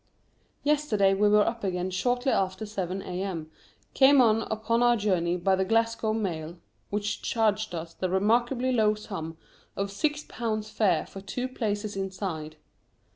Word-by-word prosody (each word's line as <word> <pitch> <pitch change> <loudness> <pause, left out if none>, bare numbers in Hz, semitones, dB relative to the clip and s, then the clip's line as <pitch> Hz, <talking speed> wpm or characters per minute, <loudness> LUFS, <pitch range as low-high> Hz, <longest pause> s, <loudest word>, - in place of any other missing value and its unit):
Yesterday 285 -10 +2
we 205 +2 +3
were 210 0 +5
up 230 -1 -3
again 185 -1 -1
shortly 245 +7 0
after 190 +2 0
seven 195 -2 -4
A.M., 180 -4 -4 0.4
came 275 +1 +6
on 225 -3 +5
upon 225 +2 0
our 240 0 +4
journey 180 -4 +1
by 190 +2 +2
the 190 - +1
Glasgow 225 +1 +1
mail, 175 -6 -3 0.3
which 205 0 -2
charged 215 -3 0
us 165 0 -6
the 185 - -2
remarkably 240 +7 +2
low 215 -3 +3
sum 165 -6 -6 0.4
of 200 0 -2
six 295 +8 -1
pounds 215 -2 -3
fare 190 -7 +2
for 195 - -10
two 245 +6 -3
places 210 -4 -3
inside. 185 -5 -4
205 Hz, 150 wpm, -27 LUFS, 185-230 Hz, 0.4 s, came